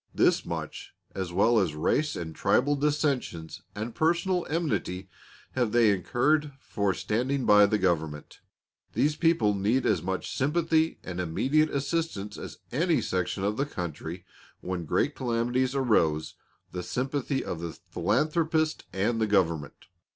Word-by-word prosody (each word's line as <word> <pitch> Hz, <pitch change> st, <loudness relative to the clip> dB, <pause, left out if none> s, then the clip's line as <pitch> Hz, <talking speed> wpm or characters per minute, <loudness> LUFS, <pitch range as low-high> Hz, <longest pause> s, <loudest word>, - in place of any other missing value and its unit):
This -, -, +3 dB
much, -, -, -6 dB, 0.2 s
as 95 Hz, -2 st, -4 dB
well 110 Hz, +6 st, +4 dB
as 85 Hz, -7 st, 0 dB
race 145 Hz, -, +1 dB
and 80 Hz, -2 st, -5 dB
tribal 145 Hz, +3 st, +2 dB
dissensions 140 Hz, -, -1 dB
and 110 Hz, +3 st, -4 dB
personal 175 Hz, -, +1 dB
enmity, 150 Hz, -, -2 dB, 0.4 s
have 120 Hz, -4 st, 0 dB
they 115 Hz, -3 st, +5 dB
incurred 145 Hz, -, +1 dB
for 100 Hz, -5 st, -1 dB
standing 130 Hz, +5 st, -1 dB
by 105 Hz, 0 st, +7 dB
the 105 Hz, -, +1 dB
Government. 80 Hz, -6 st, -1 dB, 0.5 s
These 150 Hz, +1 st, +2 dB
people 160 Hz, -11 st, +3 dB
need 105 Hz, +6 st, +1 dB
as 95 Hz, -7 st, +2 dB
much 95 Hz, +2 st, -3 dB
sympathy 160 Hz, +3 st, +1 dB
and 90 Hz, -1 st, -5 dB
immediate 135 Hz, -, +2 dB
assistance 140 Hz, -8 st, -2 dB
as -, -, -8 dB
any 165 Hz, +5 st, +2 dB
section 90 Hz, +1 st, -2 dB
of 105 Hz, +2 st, 0 dB
country 85 Hz, -, -6 dB, 0.4 s
when 90 Hz, -2 st, -4 dB
great -, -, +1 dB
calamities 125 Hz, +2 st, 0 dB
arouse 80 Hz, -, +2 dB, 0.4 s
the 90 Hz, -, -4 dB
sympathy 135 Hz, +6 st, -2 dB
of 85 Hz, -, -4 dB
the 85 Hz, -1 st, -5 dB, 0.2 s
philanthropist 155 Hz, +6 st, +1 dB
and 110 Hz, +4 st, 0 dB
the 110 Hz, -, +2 dB
Government. 85 Hz, -8 st, 0 dB
115 Hz, 135 wpm, -28 LUFS, 95-145 Hz, 0.5 s, by